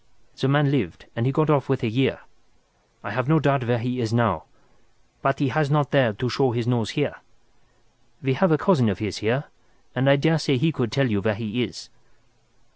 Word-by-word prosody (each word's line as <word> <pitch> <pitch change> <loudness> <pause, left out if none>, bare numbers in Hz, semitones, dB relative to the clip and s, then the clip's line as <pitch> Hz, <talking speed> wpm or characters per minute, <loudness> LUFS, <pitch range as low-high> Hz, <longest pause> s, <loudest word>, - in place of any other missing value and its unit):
"The 135 - -1
man 140 0 +3
lived 115 - -2
and 115 +2 0
he - - +2
got 155 +2 +2
off 140 -4 +1
with 130 -1 0
a - - +1
year. 130 +5 0 0.8
I - - -5
have 130 +2 -2
no 160 - +5
doubt 140 -1 +2
he 125 +1 -1
is 110 -1 -2
out 115 - +2
now, 100 -9 +1 0.8
but 135 0 +1
he 140 -2 0
has 155 +1 0
not 145 -2 +1
dared 120 -8 +2
to 125 - -2
show 130 +1 +1
his 120 0 -2
nose 120 -4 0
here. - - -1 1.1
We 135 0 +1
have 160 +7 +2
a 155 - +5
cousin 145 - +3
of 95 - -2
his 100 -2 -4
here, 120 +7 0 0.5
and 130 +2 +2
I 140 - +7
daresay 150 -1 +1
he 160 +6 +2
could 125 -7 -2
tell 140 +1 +2
you 105 -4 -1
where 110 +2 0
he 115 +2 -3
is." 115 - -6
130 Hz, 210 wpm, -23 LUFS, 115-140 Hz, 1.1 s, I